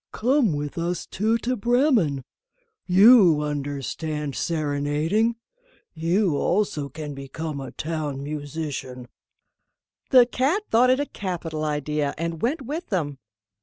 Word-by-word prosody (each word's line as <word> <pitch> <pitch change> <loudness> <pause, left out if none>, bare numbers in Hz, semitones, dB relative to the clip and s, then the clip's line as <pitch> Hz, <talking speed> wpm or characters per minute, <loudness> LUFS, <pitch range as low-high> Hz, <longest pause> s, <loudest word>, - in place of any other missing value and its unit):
"Come 245 - +2
with 145 +2 -4
us 175 +1 -2
two 220 +4 0
to 255 +1 +1
Bremen; 235 - +2 0.6
you 190 -5 +7
understand 145 +1 -3
serenading; 155 +8 0 0.6
you 170 +1 +1
also 175 -7 0
can 150 -1 -7
become 140 +2 -6
a 135 - -6
Town 150 -4 -4
Musician." 145 -4 -5 1.0
The 255 -3 +7
cat 275 - 0
thought 245 +3 +5
it 255 +1 +3
a 290 - 0
capital 170 - -5
idea, 150 -1 -1
and 165 0 -4
went 270 +4 -1
with 305 +7 -5
them. 150 -9 -2
160 Hz, 120 wpm, -24 LUFS, 145-225 Hz, 1.0 s, you